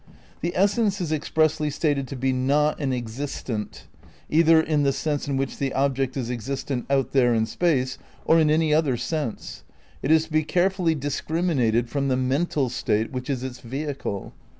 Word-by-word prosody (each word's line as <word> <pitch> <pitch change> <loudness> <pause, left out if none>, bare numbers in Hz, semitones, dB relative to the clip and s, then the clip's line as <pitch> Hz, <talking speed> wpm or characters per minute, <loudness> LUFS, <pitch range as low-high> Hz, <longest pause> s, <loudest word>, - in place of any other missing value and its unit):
The 170 +1 -1
essence 205 +1 +2
is 170 -4 -2
expressly 155 0 +1
stated 145 -2 0
to 135 - -6
be 130 +1 0
not 145 +4 +1
an 135 -2 0
existent, 120 -2 -4 0.5
either 165 +1 +6
in 155 -2 +1
the 140 -1 +3
sense 145 0 -2
in 140 -1 -1
which 135 0 -3
the 135 -1 -1
object 135 -1 0
is 125 -2 -2
existent 125 +2 -3
out 135 -2 +1
there 120 -3 +3
in 110 0 +2
space, 130 0 0 0.3
or 165 - +5
in 155 -1 +4
any 155 0 +3
other 150 -5 +2
sense. 150 -4 -4 0.4
It 135 - -2
is 160 0 +5
to 160 - -19
be 155 0 +2
care 180 +4 +2
fully 175 -4 0
discriminated 140 -5 0
from 140 +2 -1
the 130 -1 +1
"mental 135 +2 0
state" 110 -2 -1
which 130 0 -5
is 130 -3 -2
its 130 -1 -6
"vehicle." 135 -4 -5
140 Hz, 180 wpm, -24 LUFS, 130-155 Hz, 0.5 s, either